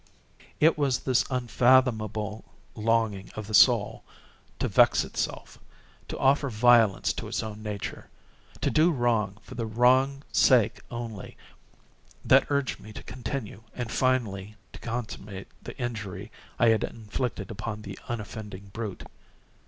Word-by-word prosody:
It 155 0 +4
was 135 -4 +1
this 130 -2 +2
unfathomable 115 -4 +2 0.3
longing 110 -3 0
of 110 - -5
the 110 - -8
soul - - +5 0.5
to - - -1
vex - - +4
itself—to - - -7
offer 140 +1 +3
violence 115 -3 +4
to - - -6
its - - -2
own 110 -1 -7
nature—to 105 -2 -6
do 160 +3 +4
wrong 115 - 0
for - - -11
the 115 -1 -3
wrong's 130 +5 +3
sake 120 -5 +4
only—that 120 +3 -3
urged 140 -2 -1
me 110 - -12
to - - -9
continue 120 -4 -6
and 120 -2 -4
finally 105 -6 0 0.2
to - - -10
consummate 105 -4 -6
the - - -9
injury 105 -5 -5 0.3
I 120 - +4
had 110 -1 +3
inflicted 115 +2 -4
upon 105 0 -5
the 100 -1 -8
unoffending 105 -3 -6
brute. 110 -4 -5
115 Hz, 125 wpm, -27 LUFS, 105-125 Hz, 0.5 s, soul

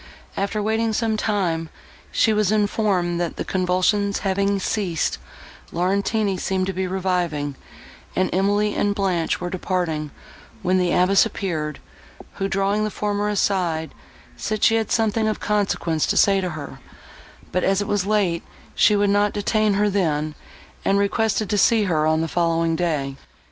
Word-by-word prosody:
After 200 +1 -1
waiting 220 +1 0
some 225 0 0
time, 180 -7 -1 0.4
she 220 - +3
was 210 -2 +2
informed, 200 -5 +1
that, 170 - -2
the - - -4
convulsions 190 +2 +1
having 200 +1 +1
ceased, 185 -5 -1 0.5
Laurentini 200 +3 0
seemed 190 0 -1
to 190 - -3
be 185 +1 -2
reviving, 175 -6 -1 0.6
and 185 - +2
Emily 205 +3 +2
and 205 0 0
Blanche 185 -5 0
were 180 0 -4
departing, 175 -5 -2 0.5
when 185 +1 +2
the 180 -1 +1
abbess 190 +2 +4
appeared, 160 -9 -3 0.6
who, 195 - -1
drawing 195 +2 0
the 215 - 0
former 205 0 -1
aside, 180 -6 0 0.4
said 215 -1 -3
she 225 - +5
had 225 -1 0
something 220 -1 +1
of 215 - -1
consequence 195 -6 0
to - - 0
say 195 -1 +4
to 180 - -2
her, 155 -3 -8 0.7
but, 180 - 0
as 195 0 +2
it 205 - -2
was 205 -2 +1
late, 195 -6 +1 0.3
she 210 - +4
would 205 0 +2
not 205 0 +2
detain 210 0 +1
her 210 +1 +2
then, 155 -6 0 0.5
and 195 - +2
requested 210 +1 +1
to 205 +2 0
see 225 0 +4
her 155 -5 +1
on 160 0 +2
the 165 - -1
following 165 0 +1
day. 150 -6 -1
195 Hz, 160 wpm, -22 LUFS, 175-210 Hz, 0.7 s, she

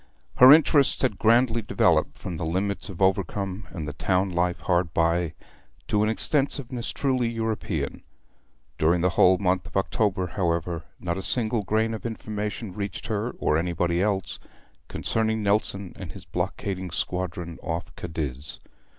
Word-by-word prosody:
Her 130 +1 +10
interests 145 -3 +5
had 125 -7 0
grandly 115 +1 +4
developed 105 - +2
from 90 -3 -6
the 80 - -4
limits 95 +5 -2
of 95 0 -2
Overcombe 95 +1 0
and 80 -4 -6
the 75 - -4
town 95 +4 0
life 90 0 0
hard 85 -3 0
by, 85 0 +1 0.5
to 105 - +2
an 105 - +2
extensiveness 130 0 -1
truly 130 -4 0
European. 110 -10 -3 0.8
During 85 +2 +3
the 90 +1 +2
whole 90 +2 +5
month 90 -2 0
of - - -4
October, 95 -1 +1
however, 85 -2 -2
not 85 +1 -2
a - - -3
single 115 +1 +2
grain 110 +3 0
of 110 - -6
information 105 -2 -4
reached 100 +1 -5
her, 110 +2 -2
or 75 - +1
anybody 85 0 0
else, 100 -2 -1 0.5
concerning 110 -1 0
Nelson 100 -2 0
and 90 -5 -8
his - - -10
blockading 95 -2 -3
squadron 85 -1 -3
off 80 +1 -4
Cadiz. 75 -4 -5
95 Hz, 150 wpm, -25 LUFS, 85-110 Hz, 0.8 s, Her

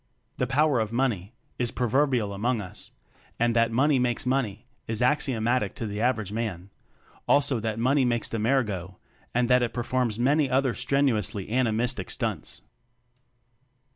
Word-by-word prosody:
The 125 - 0
"power 145 0 +2
of 110 -1 -1
money" 115 -4 -1 0.2
is 120 -1 +1
proverbial 125 -3 +1
among 115 +4 0
us; 90 -3 -7 0.5
and 120 0 +1
that 115 0 +4
"money 135 +3 +3
makes 125 -1 0
money" 125 -6 -1 0.2
is 110 -1 -1
axio 130 -1 +2
matic 115 -2 0
to 115 - -4
the 105 0 -4
average 115 -5 0
man; 100 -4 -4 0.6
also 140 -3 +3
that 110 0 -3
"money 130 +4 +2
makes 120 -2 0
the 115 - -2
mare 130 +5 +3
go," 95 -3 -6 0.4
and 125 0 +2
that 125 0 +4
it 120 -2 -2
performs 125 -2 -1
many 140 +4 +2
other 130 -1 +2
strenuously 120 -7 0
animistic 115 -4 0
stunts. - - -3
120 Hz, 155 wpm, -26 LUFS, 110-130 Hz, 0.6 s, that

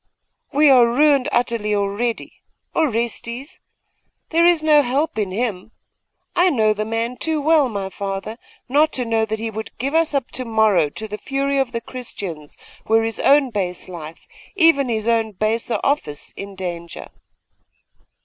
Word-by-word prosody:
'We 295 0 +5
are 245 -3 +6
ruined 280 +2 +3
utterly 230 -3 0
already. 205 +4 -2 0.3
Orestes? 240 -1 -2 0.7
There 335 +1 +4
is 340 -3 +3
no 305 -1 +6
help 275 0 -1
in 205 -3 -1
him. 210 0 -3 0.6
I 360 +1 +4
know 220 -8 +2
the 215 0 -3
man 230 +2 -2
too 320 -1 -1
well, 300 -2 +3
my 200 -3 -4
father, 195 +4 -5 0.3
not 295 +4 +3
to 250 - -1
know 225 -1 +1
that 220 0 -3
he 225 +1 -4
would 220 +1 -7
give 275 +4 -3
us 325 -2 +2
up 270 -3 -1
to 255 - -2
morrow 220 -9 +2
to 220 +9 -7
the 210 0 -6
fury 275 +3 -1
of 265 -2 0
the 230 -1 -3
Christians 195 - -7 0.3
were 225 +1 +3
his 225 -1 -3
own 280 -2 +4
base 185 -4 -3
life 165 -3 -9 0.3
even 325 -8 +4
his 220 -1 -2
own 225 -2 +1
baser 220 +2 -1
office 155 - -2
in 200 0 -8
danger. 170 -3 -6
230 Hz, 160 wpm, -20 LUFS, 210-275 Hz, 0.7 s, are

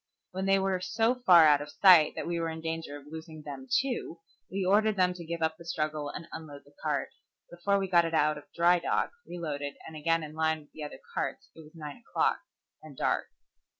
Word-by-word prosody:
When 190 +1 -3
they 195 0 +5
were 190 -1 0
so 225 +5 +1
far 185 -10 +7
out 145 -1 +5
of 145 - -7
sight 180 -6 +6
that - - -4
we 170 0 -2
were 165 -1 -1
in 160 0 -5
danger 160 -2 -4
of 145 - -14
losing 160 0 -9
them 135 -3 -8
too, 245 -10 0 0.3
we 190 0 -2
ordered 210 +3 +3
them 180 -2 +2
to 175 -1 -9
give 165 0 -4
up 160 0 0
the 170 - -12
struggle 155 -3 -2
and 165 +3 -7
unload 145 -3 -9
the 145 - -21
cart. 150 -3 -1 0.4
Before 185 +4 +1
we 195 -1 -1
got 175 -2 +4
it 165 - -3
out 150 0 +3
of - - -17
dry 175 +1 +4
dock, - - 0 0.2
reloaded, 145 -5 -4
and 160 - -9
again 165 +2 +1
in 155 0 -8
line 160 0 0
with 145 - -22
the 155 - -8
other 150 - -7
carts - - -3
it - - -16
was 155 +1 -14
nine 150 -3 -8
o'clock, 235 - 0 0.4
and 150 -4 -13
dark. - - 0
165 Hz, 225 wpm, -29 LUFS, 150-180 Hz, 0.4 s, far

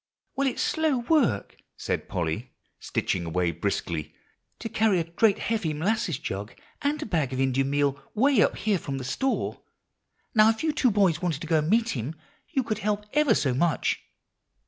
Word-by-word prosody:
"Well, 275 +1 +1
it's 260 - -1
slow 315 -4 +1
work," 240 - +1 0.2
said - - -3
Polly, 90 +9 -3 0.3
stitching 90 - -1
away 85 +1 0
briskly, 85 -2 -3 0.4
"to 225 - -5
carry 220 -4 +2
a - - +1
great 190 +5 +2
heavy 205 -9 -1
molasses 180 - 0
jug 105 -7 -5 0.3
and 290 +1 0
a - - -6
bag 160 - 0
of 130 - -3
Indian 135 +1 +1
meal 145 -1 +1
way 260 0 +4
up - - +2
here 210 -4 +1
from 140 -3 -4
the 130 - -5
store. 265 - -1 0.7
Now, 215 -2 +6
if 225 +4 -1
you 320 - +2
two 295 -4 +2
boys 195 -6 +2
wanted 170 -4 -1
to 165 - -5
go 160 -1 +3
and 155 +1 -1
meet 225 +2 +3
him, 135 - -3 0.3
you 270 -5 0
could 215 -3 -2
help 210 0 -1
ever 300 0 +4
so 130 -4 +1
much." 165 +5 +1
175 Hz, 185 wpm, -26 LUFS, -, 0.7 s, Now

